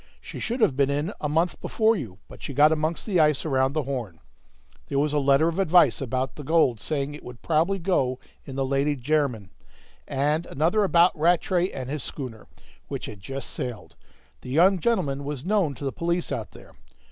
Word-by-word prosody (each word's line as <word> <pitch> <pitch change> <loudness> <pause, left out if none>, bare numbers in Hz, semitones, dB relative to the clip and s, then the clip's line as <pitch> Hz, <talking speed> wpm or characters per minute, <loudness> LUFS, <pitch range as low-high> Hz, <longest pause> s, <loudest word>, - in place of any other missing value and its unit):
She - - -9
should 240 +1 -3
have 140 - +3
been 140 0 +2
in 145 +8 -1
a 150 - -1
month 165 +4 0
before 225 0 +2
you, 110 - -6
but - - -13
she 140 - -6
got 150 +2 +6
amongst 160 +1 -1
the 195 -5 +1
ice 150 -2 +3
around 135 -2 +1
the 155 -1 0
Horn. 120 -11 -5 0.7
There 140 - -2
was 145 +1 +1
a 150 - +2
letter 140 +3 +4
of 170 +3 -2
advice 175 -8 +4
about 130 0 -2
the 150 - -7
gold, 145 -6 +2
saying 145 +1 -2
it 150 - -10
would 125 -1 -11
probably 170 +5 +1
go 165 -9 0 0.3
in 135 - -9
the 135 0 0
Lady 140 +2 +1
Jermyn; 130 -7 -1 0.6
and 150 +4 0
another 170 +9 +1
about 175 -2 +4
Rattray 175 +3 +2
and 130 -1 -6
his 145 +2 -4
schooner, 120 -6 -7 0.4
which - - -5
had 105 - -9
just 135 +7 -6
sailed; 120 -4 -6 0.5
the - - -9
young 180 +7 +4
gentleman 155 -10 0
was 145 0 -5
known 190 -8 +1
to - - -10
the 135 - -1
police 170 +1 -2
out - - -3
there." - - -15
150 Hz, 200 wpm, -25 LUFS, 135-170 Hz, 0.7 s, got